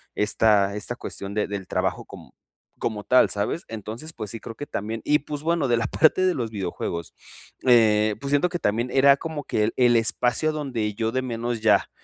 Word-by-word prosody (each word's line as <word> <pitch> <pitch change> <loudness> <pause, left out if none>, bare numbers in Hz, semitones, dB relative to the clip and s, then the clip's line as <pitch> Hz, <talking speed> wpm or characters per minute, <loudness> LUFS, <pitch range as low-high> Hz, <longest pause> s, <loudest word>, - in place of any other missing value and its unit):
esta 105 -1 +2
esta 115 +3 -3
cuestión 100 -4 -6
de 105 0 0
del 100 -2 -5
trabajo - - -2
com - - -12 0.5
como 105 -2 -3
tal, 130 - +4
¿sabes? 105 +11 -2
Entonces, 115 +8 -7
pues, 110 -6 -6
sí 115 - -6
creo 115 - -8
que 145 - -6
también 110 +2 -4
Y 150 - +3
pues, 145 0 -6
bueno, 165 -3 +1
de 120 -1 +2
la 115 0 -1
parte 160 +7 +3
de 185 - +3
los 115 -3 -3
videojuegos, 85 -4 -4 0.5
eh, 110 -4 +4
pues 140 - -4
siento 145 +5 +3
que 175 -1 -4
también, 115 +2 0
era 140 +1 +5
como 155 -1 -5
que 110 - 0
el 110 - -2
el 120 -1 +4
espacio 120 +6 +1
donde 125 -9 -3
yo, 110 0 -1
de 130 +2 -1
menos, 120 -1 -3
ya, 105 -3 +3
115 Hz, 205 wpm, -24 LUFS, 105-140 Hz, 0.5 s, era